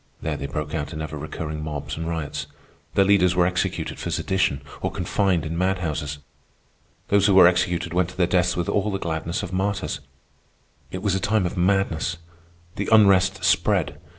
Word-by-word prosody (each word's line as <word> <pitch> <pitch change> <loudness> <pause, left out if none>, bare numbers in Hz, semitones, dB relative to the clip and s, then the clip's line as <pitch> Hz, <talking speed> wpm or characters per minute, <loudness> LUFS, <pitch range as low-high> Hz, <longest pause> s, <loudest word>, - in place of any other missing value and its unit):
There 80 -1 -2
they 70 -1 -5
broke 75 +1 -4
out 75 0 -3
in 75 - -5
ever 75 -1 -5
recurring 75 +1 -5
mobs 75 -2 -4
and 80 +1 -4
riots. 80 -4 -4 0.5
Their 100 -1 +5
leaders 90 -3 +4
were 90 -1 +4
executed 90 0 -2
for - - -4
sedition 90 -7 0 0.2
or - - -1
confined 95 -6 0
in 80 +2 -3
madhouses. 85 -6 -1 0.9
Those 100 0 +4
who 100 - +4
were 95 -2 +9
executed 90 -1 0
went 90 -1 +1
to 90 - -13
their 90 - +3
deaths 90 0 +1
with 85 - -1
all 100 +1 0
the 95 - -1
gladness 85 +1 -3
of 95 -1 -6
martyrs. 100 +1 -1 0.9
It 95 +1 -6
was 100 -3 +1
a 95 - +1
time 105 -1 +1
of 90 - -3
madness. 90 -2 +1 0.6
The 100 - -2
unrest 100 -3 +5
spread. - - +2
90 Hz, 180 wpm, -23 LUFS, 80-95 Hz, 0.9 s, were